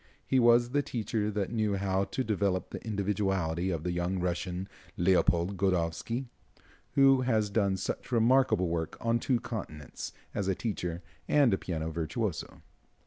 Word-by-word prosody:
He 130 - +2
was 120 0 +5
the 145 +2 +2
teacher 110 -5 -2
that 105 -1 -2
knew 110 -3 +1
how 95 0 0
to 130 - -2
develop 100 -4 0
the - - -7
individuality 95 -5 -1
of 85 -4 -2
the 90 - -1
young 90 +2 -1
Russian, 90 +1 -2 0.3
Leopold 90 +1 +2
Godowsky, 90 +6 0 0.7
who 135 -1 +6
has 110 -5 +1
done 100 -2 +1
such 95 - -4
remarkable 120 -5 +3
work 80 -1 -2
on 115 0 +1
two 125 0 +1
continents, 80 - -6 0.2
as 100 - -2
a 95 - +1
teacher 90 -6 -3 0.2
and 130 -10 +3
piano 80 -2 -3
virtuoso. 85 +5 -3
100 Hz, 145 wpm, -30 LUFS, 90-115 Hz, 0.7 s, who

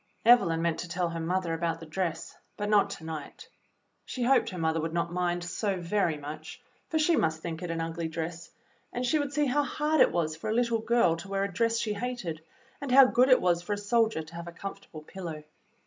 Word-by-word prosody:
Evelyn 190 -9 +5
meant 170 -1 0
to 180 - -5
tell 175 0 -1
her 165 0 -4
mother 175 +1 -1
about 165 0 -1
the 165 - -9
dress, 165 +1 -3 0.2
but 205 0 -2
not 205 -1 +4
to 180 - -8
night. 160 -2 -7 0.6
She 250 - -4
hoped 250 -1 +3
her 185 - -7
mother 160 -1 0
would 160 +1 -3
not 170 0 -1
mind 175 -1 0
so 190 +2 -2
very 170 -2 0
much, 150 +2 -8 0.3
for 320 - 0
she 315 +2 +3
must 160 - 0
think 165 -2 -4
it 180 - -4
an 165 0 -2
ugly 165 0 -3
dress, 165 +1 -5 0.4
and 245 +1 -2
she 310 +5 +2
would 285 -1 -2
see 295 +1 +1
how 285 +2 +2
hard 300 +1 +1
it - - +6
was 155 -2 -1
for 160 - -5
a 220 - 0
little 235 -1 +2
girl 220 -7 +2
to 180 - -9
wear 195 0 -1
a 200 -2 -3
dress 230 +3 +1
she 215 -2 -1
hated, 205 -8 -4 0.4
and 280 -3 -4
how 270 +1 +9
good 250 +1 +3
it 255 - +6
was 175 -1 +2
for 205 +4 -3
a - - -2
soldier 220 -3 +1
to 155 +2 -15
have 170 0 -7
a - - -6
comfortable 170 -3 -8
pillow. 165 -3 -7
180 Hz, 235 wpm, -29 LUFS, 165-230 Hz, 0.6 s, how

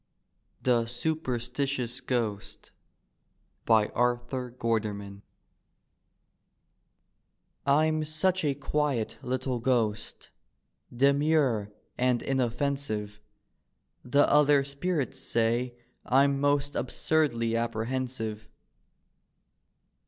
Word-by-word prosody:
THE 120 -2 +2
SUPERSTITIOUS 125 -1 -2
GHOST: 115 -6 -3 1.0
Arthur 120 +3 +1
GUITSRMAN 105 -4 -3 2.5
I'm 155 +2 +3
such 160 +5 0
a 145 -2 +1
quiet 145 -4 -1
little 130 0 -2
ghost, 115 -4 -1 0.6
Demure 140 -4 +2 0.3
and 125 -1 +2
inofEcnsive, 125 -5 -2 0.8
The 140 +3 +3
other 145 -1 +5
spirits 140 +1 -2
say 120 +2 0 0.3
I'm 140 +2 +3
most 145 0 +1
Absurdly 120 -4 0
apprehensive. 115 -1 -3
125 Hz, 65 wpm, -28 LUFS, 115-140 Hz, 2.5 s, other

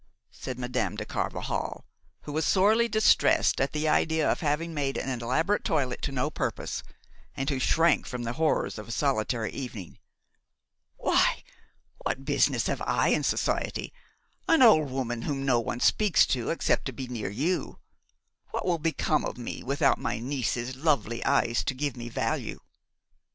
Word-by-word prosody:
said 130 - -7
Madame 125 0 -2
de - - -4
Carvajal, - - -3 0.4
who 150 - -8
was 155 +1 0
sorely 215 +7 +4
distressed 215 - +3
at 135 - +1
the 155 +1 -1
idea 160 0 +2
of - - +1
having 160 +2 -1
made 140 -3 -1
an 130 -3 -3
elaborate 160 - +1
toilet 140 -6 -1
to - - -2
no 125 -2 -1
purpose, - - -3 0.6
and 135 +2 -1
who 135 - -1
shrank 165 +4 +3
from 125 -2 -5
the 115 0 -3
horrors 155 -6 0
of 105 - -9
a - - -7
solitary 115 -4 0
evening. 115 -10 -7 1.0
"Why, - - +2 0.6
what 135 - -3
business - - +2
have - - -2
I - - +1
in - - +2
society, - - -1 0.5
an 325 -5 +5
old 155 - +6
woman 125 -3 -3
whom 135 0 -3
no 125 -3 +3
one 115 +1 -3
speaks 210 +7 +4
to 120 -3 -2
except 165 - 0
to 130 - -2
be 130 +1 -6
near 115 -5 -4
you? 150 - -2 0.7
What - - -3
will 175 -2 +1
become 155 -1 0
of - - -4
me 120 - -6
without 140 +1 +2
my 120 - -2
niece's 125 0 -2
lovely 135 -5 0
eyes 120 -4 +2
to 130 - -1
give 140 +1 -2
me 120 -1 -7
value?" - - -2
135 Hz, 165 wpm, -27 LUFS, 120-155 Hz, 1.0 s, old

